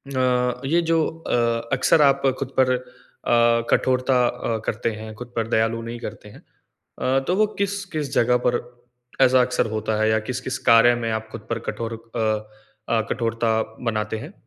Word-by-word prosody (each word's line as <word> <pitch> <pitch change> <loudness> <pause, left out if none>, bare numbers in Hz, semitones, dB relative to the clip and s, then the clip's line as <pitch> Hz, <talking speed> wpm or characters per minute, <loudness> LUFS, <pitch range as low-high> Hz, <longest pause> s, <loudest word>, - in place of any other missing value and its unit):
अ 125 -1 +1
ये 170 +5 +2
जो 160 -1 +3
अ, 115 -7 -1
अक्सर 135 +4 +4
आप 140 -1 +4 0.2
खुद 135 - -5
पर 130 -1 +4
अ, 125 - -1 0.9
कठोरता 130 -1 +2
अ, 115 -1 -2
करते 115 +1 -1
हैं, 110 0 -8
खुद 120 +1 -10
पर 115 -1 -1
दयालु 115 0 +1
नहीं 115 +1 -6
करते - - -8
हैं। - - -15 0.6
अ, 130 +1 +2
तो 180 - +2
वो 215 +1 +3
किस-किस 190 -8 -3
जगह 125 +1 +3
पर 120 0 +2 0.6
ऐसा 130 -1 +6
अक्सर 125 -2 +1
होता 110 0 -1
है 110 - +3
या 110 0 +3
किस-किस 125 +1 -3
कार्य 115 +1 +7
में 115 -1 -2
आप 110 0 -3
खुद - - -9
पर - - -1
कठोर 115 0 -4 0.2
अ 115 - 0 0.7
अ, 115 -1 +2
कठोरता 115 -1 0 0.2
बनाते 110 -1 -1
हैं? 155 - -9
120 Hz, 175 wpm, -23 LUFS, 115-130 Hz, 0.9 s, कार्य